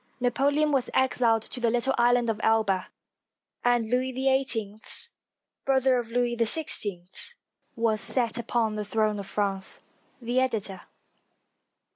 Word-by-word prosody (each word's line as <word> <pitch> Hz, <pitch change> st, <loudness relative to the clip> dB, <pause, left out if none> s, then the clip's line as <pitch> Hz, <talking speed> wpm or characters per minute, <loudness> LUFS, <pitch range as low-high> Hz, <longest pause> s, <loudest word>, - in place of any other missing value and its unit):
Napoleon 285 Hz, +4 st, +2 dB
was 265 Hz, -3 st, +1 dB
exiled 235 Hz, -4 st, +2 dB
to 250 Hz, -, -7 dB
the 235 Hz, -1 st, +2 dB
little 245 Hz, +3 st, +1 dB
island 240 Hz, 0 st, +3 dB
of 220 Hz, -1 st, -1 dB
Elba, 210 Hz, -4 st, +2 dB, 0.8 s
and 240 Hz, -2 st, +2 dB
Louis 250 Hz, +3 st, 0 dB
XVIII, 255 Hz, -5 st, 0 dB, 0.8 s
brother 265 Hz, -1 st, +3 dB
of 235 Hz, -2 st, -5 dB
Louis 240 Hz, 0 st, 0 dB
XVI, 220 Hz, -, -2 dB, 0.4 s
was 225 Hz, -2 st, +1 dB
set 240 Hz, 0 st, 0 dB
upon 230 Hz, -1 st, 0 dB
the 210 Hz, 0 st, -3 dB
throne 215 Hz, 0 st, 0 dB
of 195 Hz, -, -7 dB
France. 195 Hz, -2 st, -2 dB, 0.4 s
The 245 Hz, +1 st, 0 dB
Editor. 210 Hz, -7 st, -1 dB
235 Hz, 125 wpm, -27 LUFS, 215-255 Hz, 0.8 s, island